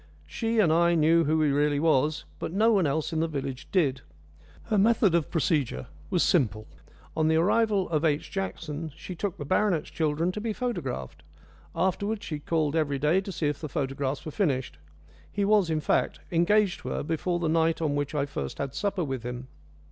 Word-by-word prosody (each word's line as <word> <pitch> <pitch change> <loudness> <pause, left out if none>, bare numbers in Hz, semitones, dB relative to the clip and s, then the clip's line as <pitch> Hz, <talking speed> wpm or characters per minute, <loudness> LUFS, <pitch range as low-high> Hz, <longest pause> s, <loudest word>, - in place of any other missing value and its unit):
She 230 0 -2
and 175 -8 +4
I 170 +1 +4
knew 165 +1 +4
who 155 +1 +2
he 150 - +3
really 145 0 +2
was; 155 -1 +2
but - - -4
no 215 +5 +3
one 195 -7 +3
else 155 +3 -1
in 160 - 0
the 165 - +1
village 135 -4 -5
did. 140 -9 +1 0.6
Her 220 -2 0
method 215 -3 +4
of 170 -3 +1
procedure 155 -7 0 0.2
was 180 -3 +2
simple. 110 - +1 0.5
On 155 -1 +2
the 160 - +3
arrival 200 +3 +2
of 155 -2 0
H. 150 -2 0
Jackson 165 -5 -4
she 180 - -8
took 190 +2 -3
the 145 - -6
baronet's 185 -1 +1
children 160 +2 0
to 210 - -5
be 220 0 -2
photographed; 175 - -4 0.5
afterwards 200 +5 -1
she 150 -3 -4
called 155 0 0
every 145 -3 +1
day 150 +7 +2
to 195 - -6
see 160 -3 -3
if 145 -1 -1
the 155 - -5
photographs 135 +1 -2
were 155 - -5
finished. 130 - -1 0.5
He 200 - 0
was, 205 -4 +3
in 155 -1 0
fact, - - 0
engaged 175 +1 +3
to - - -6
her - - -2
before 165 +3 -1
the 170 -1 -1
night 165 0 +2
on 155 -3 0
which 145 +1 -2
I 140 -1 +1
first 70 - -5
had 135 -1 -4
supper 200 +3 -1
with 135 -4 -3
him. 125 +2 -6
160 Hz, 200 wpm, -27 LUFS, 145-185 Hz, 0.6 s, and